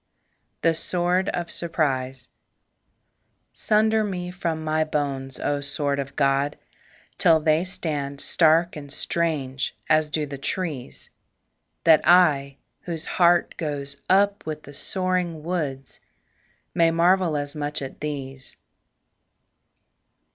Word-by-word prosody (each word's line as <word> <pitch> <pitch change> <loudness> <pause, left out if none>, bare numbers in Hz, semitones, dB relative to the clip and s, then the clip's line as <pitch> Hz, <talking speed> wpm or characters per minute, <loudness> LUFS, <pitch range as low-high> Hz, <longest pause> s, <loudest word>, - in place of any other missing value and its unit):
THE 165 - +4
SWORD 180 +3 +1
OF 175 -1 -3
SURPRISE 135 -6 -1 1.3
Sunder 220 +1 +2
me 180 -3 -4
from 170 -3 -3
my 155 0 +1
bones, 140 -4 -2
O 145 0 -1
sword 140 0 -1
of 140 0 -5
God, 140 +1 +1 0.6
Till 160 -1 +5
they 155 +1 +2
stand 145 -6 -3
stark 165 +2 +4
and 145 -2 -7
strange 140 -6 -1
as 155 0 +3
do 150 0 -1
the 140 -1 -8
trees; 150 -4 -4 0.7
That 160 -2 +6
I 145 -6 +4 0.2
whose 170 -2 -5
heart 175 -1 +2
goes 140 -3 -3
up 200 +1 +3
with 155 -1 -5
the 145 - -12
soaring 180 0 -1
woods 145 -6 -4 0.7
May 165 -1 +4
marvel 170 -1 +2
as 145 0 -3
much 150 0 -3
at 135 - -8
these. 135 -3 -6
155 Hz, 115 wpm, -24 LUFS, 140-175 Hz, 1.3 s, That